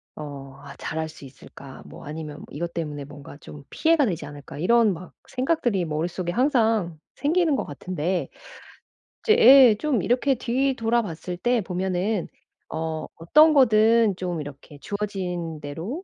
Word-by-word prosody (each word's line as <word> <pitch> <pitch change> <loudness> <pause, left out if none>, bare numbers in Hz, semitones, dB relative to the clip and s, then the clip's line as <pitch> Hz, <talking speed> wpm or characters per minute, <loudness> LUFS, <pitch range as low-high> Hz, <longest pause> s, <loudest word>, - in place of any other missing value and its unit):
어 140 -2 -9
'아 140 -1 -11
잘할 160 0 -4
수 150 - -13
있을까?' 135 0 -13
뭐 - - -12
아니면 150 0 -7
'이것 170 +3 -5
때문에 150 -4 -4
뭔가 145 0 -12
좀 145 -1 -12
피해가 320 -3 +3
되지 180 -7 -3
않을까?' 145 0 -10
이런 225 +4 +3
막 180 +2 -10
생각들이 250 - 0
머릿속에 170 +3 -3
항상 225 - +1 0.2
생기는 320 +1 +1
것 - - -1
같은데 170 +1 -3 0.9
이제 440 -1 +4
예. 265 - +8
좀 260 -1 0
이렇게 255 +3 +2
뒤돌아봤을 235 - -1
때 240 +5 +1
보면은 185 +1 -2 0.4
어 160 -1 -4
'어떤 305 - +5
거든 225 -4 +4
좀 175 -3 -3
이렇게 145 0 -11
주어진 180 -5 -4
대로 170 - -6
180 Hz, 290 characters per minute, -24 LUFS, 155-235 Hz, 0.9 s, 예